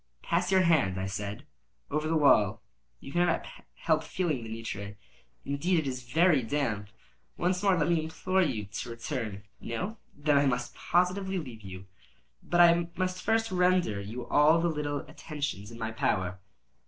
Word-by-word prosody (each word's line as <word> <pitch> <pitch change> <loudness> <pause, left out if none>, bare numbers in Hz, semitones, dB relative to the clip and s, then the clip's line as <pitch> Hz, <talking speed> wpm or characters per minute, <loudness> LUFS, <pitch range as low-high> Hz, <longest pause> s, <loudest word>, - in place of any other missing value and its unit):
"Pass 180 +2 0
your 190 -1 +5
hand," 135 - +3
I 95 - -2
said, 100 +1 -5 0.5
"over 150 +2 0
the 160 0 +2
wall; 110 -7 +4 0.4
you - - -10
cannot 175 +2 +1 0.3
help 160 -1 +1
feeling 160 -7 -1
the 110 - -7
nitre. 105 -3 -6 0.5
Indeed 165 +6 +1
it 155 -3 0
is 130 -1 -3
very 165 -2 +4
damp. 115 -5 -2 0.5
Once 180 +1 0
more 195 -3 +3
let 150 -1 +1
me 165 -2 +2
implore 185 +4 0
you 125 - 0
to 110 +4 -6
return. 115 -4 -4 0.2
No? 185 - -4 0.2
Then 145 -1 +3
I 140 - +3
must 125 -2 -1
positively 190 +2 0
leave 125 -10 -6
you. 95 -2 -9 0.6
But 175 0 +2
I 170 0 +6
must 185 0 -1
first 225 0 +1
render 180 - +2
you 115 +5 -6
all 150 +5 +5
the 170 +1 +1
little 145 -2 -2
attentions 145 -10 -5
in 115 - -10
my 110 -1 -3
power." 95 -4 -1
145 Hz, 165 wpm, -29 LUFS, 110-175 Hz, 0.6 s, I